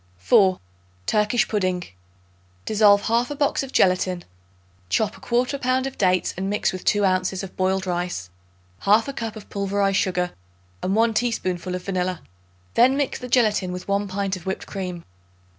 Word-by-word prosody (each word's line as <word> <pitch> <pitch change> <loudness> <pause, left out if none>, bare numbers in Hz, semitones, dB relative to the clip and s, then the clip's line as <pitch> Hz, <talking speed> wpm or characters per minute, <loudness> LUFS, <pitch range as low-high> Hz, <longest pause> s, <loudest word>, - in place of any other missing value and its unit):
4. 185 - +4 0.5
Turkish 210 +2 +2
Pudding. 185 -4 0 0.8
Dissolve 205 -1 +5
1/2 240 +5 0
box 285 -1 +1
of 270 -1 -6
gelatin; 185 -3 +2 0.7
chop 215 - +1
1/4 250 +3 0
pound 255 +1 +1
of 270 - -4
dates 185 -2 +1
and 190 +2 -3
mix 205 -1 0
with 185 - -6
2 205 -1 +3
ounces 185 0 0
of 190 - -8
boiled 190 +1 0
rice, 175 - -3 0.5
1/2 225 +7 +3
cup 225 -2 -4
of 215 - -10
pulverized 200 0 0
sugar 180 -1 0 0.5
and 190 - 0
1 225 +1 +3
teaspoonful 185 -6 -1
of 180 - -5
vanilla; 185 -2 -2 0.5
then 255 +3 +5
mix 285 -2 -1
the 250 - -7
gelatin 215 -7 +2
with 180 0 -6
1 200 +1 0
pint 195 0 -2
of 185 0 -10
whipped 190 - -3
cream. 180 -3 -5
195 Hz, 160 wpm, -23 LUFS, 185-225 Hz, 0.8 s, Dissolve